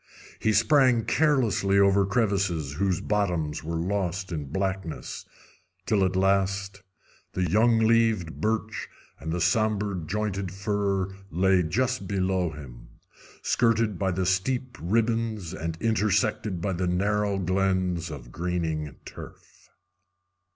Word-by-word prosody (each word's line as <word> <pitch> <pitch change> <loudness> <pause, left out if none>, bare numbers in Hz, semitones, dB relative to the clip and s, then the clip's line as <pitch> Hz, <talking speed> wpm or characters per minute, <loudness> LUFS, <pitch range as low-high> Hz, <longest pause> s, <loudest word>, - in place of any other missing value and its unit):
He 110 - +2
sprang 130 -2 +4
carelessly 125 -10 +2
over 100 0 +4
crevices 100 - 0
whose 95 +2 0
bottoms 90 -8 -1
were 85 +2 -3
lost 95 +1 -2
in 75 -4 -3
blackness, 95 +2 -4 0.6
till 105 -3 +2
at 95 0 0
last 95 +1 +1 0.5
the 90 -1 0
young 115 +4 +4
leaved 110 -6 +2
birch 110 0 -2 0.3
and 80 - -5
the 90 - -1
somber 105 +2 +1
pointed 95 +2 -3
fir 100 -1 -1
lay 95 +2 +3
just 120 +5 -1
below 95 -2 0
him, 65 -6 -11 0.6
skirted 115 -4 +2
by 95 - +1
the 95 0 -1
steep 125 +7 0
ribands 110 -1 0
and 80 -2 -4
intersected 105 -3 0
by 100 +1 -1
the 90 +1 -1
narrow 100 +2 +1
glens 95 -2 0
of 65 -6 -9
greening 80 -4 -2
turf. - - -12
95 Hz, 120 wpm, -26 LUFS, 90-105 Hz, 0.6 s, sprang